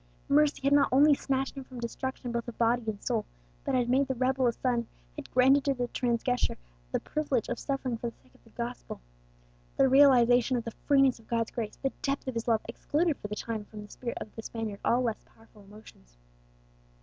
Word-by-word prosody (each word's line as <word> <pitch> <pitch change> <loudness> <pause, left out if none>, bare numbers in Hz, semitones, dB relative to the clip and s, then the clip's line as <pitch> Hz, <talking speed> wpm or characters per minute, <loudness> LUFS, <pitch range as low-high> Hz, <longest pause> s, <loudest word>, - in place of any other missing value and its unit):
Mercy 295 +1 +3
had 275 +1 +3
not 285 -1 +5
only 290 +3 +6
snatched 270 -1 -1
him 270 - -6
from 255 -1 -10
destruction 245 +1 -4
both 235 0 -3
of 240 - -7
body 235 +1 +2
and 210 -2 -4
soul, - - 0 0.4
but 270 - 0
had 245 -2 +2
made 265 +2 +2
the 265 - -2
rebel 260 +1 +1
a - - +3
son, 235 -1 -1 0.3
had - - -8
granted 265 +2 +4
to 275 -1 +1
the 245 -1 -2
transgressor 245 0 0 0.3
the - - 0
privilege 285 -7 -2
of 240 - -3
suffering 265 -4 -2
for 235 - -2
the - - -18
sake 130 - -26
of - - -25
the - - -20
gospel. - - -6 0.8
The 270 - +5
realization 255 -2 +5
of 235 - -3
the 230 - -5 0.2
freeness 275 -4 +4
of 225 - -20
God's 230 -1 -1
grace, 220 -3 -4
the 270 - -2
depth 275 -1 -2
of 260 - -2
His 230 0 -4
love, 225 -2 +3
excluded 300 +6 0
for - - -7
the 210 - -5
time 220 -1 -4
from 210 0 -10
the 205 - -16
spirit 240 -2 -5
of 210 - -8
the 225 - -6
Spaniard 220 -3 -5
all 245 +2 +2
less 225 -3 -2
powerful 225 -1 -21
emotions. 195 - -16
245 Hz, 220 wpm, -29 LUFS, 230-270 Hz, 0.8 s, only